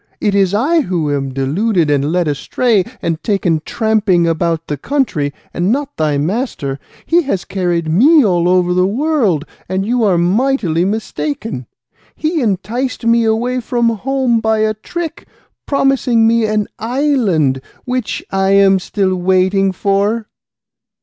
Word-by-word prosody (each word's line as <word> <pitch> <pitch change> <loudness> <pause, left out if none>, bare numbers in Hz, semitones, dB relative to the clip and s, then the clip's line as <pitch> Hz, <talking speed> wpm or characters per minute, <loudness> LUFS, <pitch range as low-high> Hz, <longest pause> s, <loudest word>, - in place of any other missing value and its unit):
it 205 - 0
is 195 -2 +2
I 290 +11 +2
who 165 - -1
am 135 -1 -3
deluded, 155 - 0
and 145 +1 +1
led 175 -1 +1
astray, 195 - +1 0.2
and 165 -1 -2
taken 180 -7 0
tramping 210 -6 +1
about 165 0 -1
the 150 - -3
country, 155 - -1 0.2
and 175 +4 0
not 285 +2 -2
thy 150 -2 0
master! 150 - -2 0.3
He 345 +1 +3
has 230 - -2
carried 175 -4 -1
me 265 - +5
all 175 -3 +2
over 180 -1 +2
the 180 +1 +2
world, 225 - 0 0.2
and 190 +1 -1
you 240 +1 0
are 195 -5 +3
mightily 180 - +1
mistaken. 155 - -4 0.5
He 315 0 -1
enticed 230 +4 -2
me 230 0 +3
away 240 +3 0
from 240 -1 0
home 245 +1 0
by 220 0 +1
a 215 0 +1
trick, 325 +9 -6 0.4
promising 270 -5 +2
me 230 0 +3
an 215 -1 0
island, 225 - +1 0.2
which 250 -3 -3
I 195 0 +1
am 195 -1 +5
still 190 0 -1
waiting 190 +2 +2
for." 200 +4 0
200 Hz, 145 wpm, -16 LUFS, 175-235 Hz, 0.5 s, me